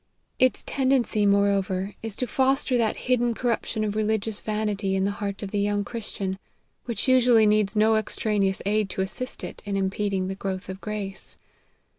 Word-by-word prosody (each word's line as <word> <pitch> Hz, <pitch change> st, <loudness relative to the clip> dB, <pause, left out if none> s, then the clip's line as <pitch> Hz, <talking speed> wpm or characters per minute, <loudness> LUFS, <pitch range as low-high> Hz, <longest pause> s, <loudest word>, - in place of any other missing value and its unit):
Its 255 Hz, 0 st, +3 dB
tendency, 255 Hz, -6 st, +2 dB
moreover, 200 Hz, -1 st, +1 dB
is 225 Hz, -3 st, 0 dB
to 250 Hz, -, -1 dB
foster 265 Hz, +2 st, +2 dB
that 230 Hz, -3 st, +2 dB
hidden 240 Hz, -2 st, +2 dB
corruption 230 Hz, -2 st, -1 dB
of 210 Hz, -1 st, -2 dB
religious 215 Hz, 0 st, -1 dB
vanity 210 Hz, -2 st, -1 dB
in 190 Hz, -, +1 dB
the 200 Hz, -, +1 dB
heart 200 Hz, 0 st, -3 dB
of 195 Hz, -, -5 dB
the 205 Hz, -, 0 dB
young 205 Hz, 0 st, +1 dB
Christian, 200 Hz, -5 st, -4 dB, 0.5 s
which 235 Hz, -1 st, -2 dB
usually 245 Hz, -3 st, +5 dB
needs 210 Hz, 0 st, +2 dB
no 220 Hz, +1 st, +4 dB
extraneous 210 Hz, -3 st, 0 dB
aid 210 Hz, 0 st, +1 dB
to 190 Hz, -, -2 dB
assist 255 Hz, +7 st, -3 dB
it -, -, -7 dB
in 200 Hz, -2 st, -2 dB
impeding 195 Hz, 0 st, -1 dB
the 190 Hz, -, -2 dB
growth 190 Hz, -1 st, -5 dB
of 190 Hz, +1 st, -6 dB
grace. 205 Hz, -2 st, -5 dB
210 Hz, 170 wpm, -25 LUFS, 195-225 Hz, 0.5 s, usually